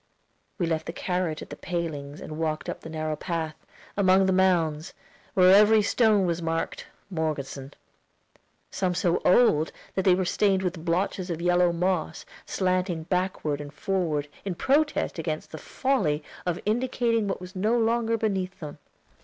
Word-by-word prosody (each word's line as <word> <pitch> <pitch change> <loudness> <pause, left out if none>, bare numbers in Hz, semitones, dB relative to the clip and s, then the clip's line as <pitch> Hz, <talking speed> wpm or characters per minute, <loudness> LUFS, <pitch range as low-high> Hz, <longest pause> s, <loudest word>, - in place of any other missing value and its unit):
We 180 - 0
left 160 -1 -2
the 165 - -4
carriage 180 -3 -2
at - - -14
the - - -5
palings 155 -5 -4
and 155 0 -7
walked 155 -1 -2
up - - -5
the 160 - -9
narrow 155 -1 -2
path, 160 -1 -3 0.4
among 190 -1 +4
the 190 - +2
mounds, 170 -4 +1 0.4
where 185 0 +7
every 210 +1 +6
stone 210 -2 +3
was 170 -1 -1
marked 165 0 -3 0.2
"Morgeson." 145 -4 -3 1.0
Some 180 -2 -1
so 175 0 +1
old 170 -7 +4 0.2
that 190 - 0
they 185 -1 +5
were 185 0 0
stained 195 +1 +2
with 175 -3 -3
blotches 180 +2 -1
of 165 -2 -3
yellow 175 0 +3
moss, 180 +2 -1 0.2
slanting 185 -3 0
backward 180 -4 -1
and 145 -1 -8
forward, 155 -3 -1 0.2
in 190 -3 -3
protest 290 - +1
against 155 -1 -4
the 155 - -7
folly 180 - 0 0.2
of 175 -1 0
indicating 230 -1 +1
what 195 - -2
was 180 +1 -10
no 215 +6 +1
longer 230 0 +1
beneath 195 -4 -2
them. 150 -3 -8
180 Hz, 160 wpm, -26 LUFS, 160-195 Hz, 1.0 s, where